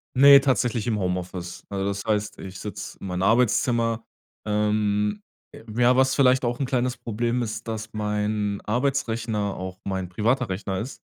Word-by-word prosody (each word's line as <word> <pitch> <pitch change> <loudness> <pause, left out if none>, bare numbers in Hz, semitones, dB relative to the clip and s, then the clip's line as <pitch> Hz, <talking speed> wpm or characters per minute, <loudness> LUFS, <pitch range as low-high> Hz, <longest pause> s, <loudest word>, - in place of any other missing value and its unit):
Ne, 140 +1 +9
tatsächlich 125 -4 +1
im 110 -3 0
Homeoffice. 90 -1 -3
Äh, 100 - -3
das 100 0 -2
heißt, 105 -1 -1
ich 95 -1 -8
sitz 100 -1 -6
in - - -6
meinem 90 0 -2
Arbeitszimmer. 115 0 +2 0.4
Ähm 105 0 0 0.3
j - - -12 0.2
ja, 125 +1 +5
was 130 0 +3
vielleicht 130 -2 +4
auch 120 +2 -1
'n 135 - 0
kleines 125 0 0
Problem 120 +2 -1
ist, 115 +1 -5
dass 110 0 -5
mein 105 -1 -1
Arbeitsrechner 115 -4 -1
auch 95 0 -6
mein 95 -2 -3
privater 115 +6 0
Rechner 95 0 -3
ist. 125 +5 -6
110 Hz, 160 wpm, -25 LUFS, 100-120 Hz, 0.4 s, Ne